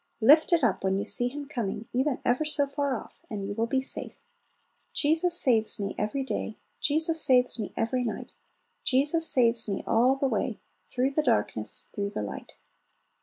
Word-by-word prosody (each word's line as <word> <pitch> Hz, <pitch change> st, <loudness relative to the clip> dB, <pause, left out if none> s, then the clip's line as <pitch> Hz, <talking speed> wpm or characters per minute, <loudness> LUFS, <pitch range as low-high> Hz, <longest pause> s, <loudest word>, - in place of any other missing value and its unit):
Lift 295 Hz, +10 st, +5 dB
it 335 Hz, -4 st, +3 dB
up 215 Hz, -6 st, +1 dB
when 190 Hz, 0 st, +1 dB
you 200 Hz, -, -2 dB
see 245 Hz, -, +3 dB
him 285 Hz, +3 st, -7 dB
coming, 230 Hz, -6 st, -4 dB
even 260 Hz, +2 st, 0 dB
ever 250 Hz, +5 st, +2 dB
so 300 Hz, -2 st, +1 dB
far 280 Hz, -1 st, -2 dB
off, -, -, -13 dB
and 205 Hz, -3 st, -5 dB
you 205 Hz, -, -4 dB
will 225 Hz, +2 st, -1 dB
be 260 Hz, +2 st, 0 dB
safe. 265 Hz, -, -4 dB, 0.8 s
"Jesus 330 Hz, +4 st, +2 dB
saves 225 Hz, -5 st, +2 dB
me 200 Hz, -1 st, -3 dB
every 215 Hz, +7 st, -2 dB
day, 225 Hz, -4 st, -4 dB, 0.2 s
Jesus 320 Hz, +2 st, +2 dB
saves 250 Hz, -3 st, +3 dB
me 210 Hz, -, -4 dB
every 245 Hz, +2 st, 0 dB
night; 225 Hz, -, -5 dB, 0.5 s
Jesus 295 Hz, +5 st, +2 dB
saves 230 Hz, -3 st, +4 dB
me 195 Hz, -, -3 dB
all 245 Hz, +4 st, +3 dB
the 275 Hz, 0 st, 0 dB
way, 225 Hz, -1 st, -2 dB, 0.2 s
Through 255 Hz, +2 st, -2 dB
the 310 Hz, -, +1 dB
darkness, 225 Hz, -, -1 dB
through 200 Hz, 0 st, -3 dB
the 155 Hz, -, -4 dB
light." 100 Hz, -, -8 dB
250 Hz, 180 wpm, -27 LUFS, 220-285 Hz, 0.8 s, Lift